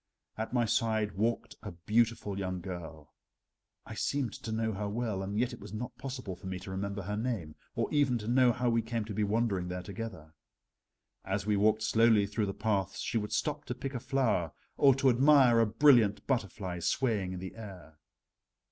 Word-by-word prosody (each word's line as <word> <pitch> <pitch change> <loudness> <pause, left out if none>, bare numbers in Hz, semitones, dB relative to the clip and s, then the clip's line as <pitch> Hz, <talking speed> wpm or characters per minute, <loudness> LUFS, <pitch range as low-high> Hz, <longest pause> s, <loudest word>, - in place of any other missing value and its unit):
At 110 +1 -4
my 120 -1 +2
side 110 -1 +1
walked 115 +5 -2
a 105 -4 -7
beautiful 105 +3 0
young 95 -1 -3
girl. 85 -4 -8 0.7
I - - -8
seemed 135 -6 -1
to 110 - -7
know 110 0 0
her 105 0 -3
well, 110 -3 -2
and 100 +2 -4
yet 125 +2 +1
it 120 - -9
was 105 +1 -10
not 120 +3 -5
possible 125 -8 -5
for 95 - -10
me 95 0 -3
to 95 +1 -8
remember 100 +1 -3
her 105 +3 -3
name, 105 -9 -3 0.2
or - - 0
even 140 -4 +3
to 105 -1 -7
know 125 +1 +5
how 125 +1 -1
we 115 -1 +3
came 115 -1 -3
to 105 - -6
be 105 - 0
wandering 105 -3 0
there 90 0 -4
together. 95 -6 -7 0.9
As 95 +1 -2
we 105 -1 +2
walked 110 +2 +3
slowly 110 -2 +4
through 105 +1 -1
the 100 - -3
paths 100 -3 -1
she 115 - -1
would 105 0 -5
stop 150 -1 -1
to 125 - -4
pick 135 +2 -5
a 125 - -3
flower 125 - 0 0.2
or 135 -2 +5
to 135 0 +1
admire 130 -2 +6
a 115 - +4
brilliant 110 -4 +4
butterfly 100 -7 -2
swaying 100 -2 0
in 90 - -5
the 95 0 -7
air. 95 -8 -11
110 Hz, 200 wpm, -31 LUFS, 95-120 Hz, 0.9 s, admire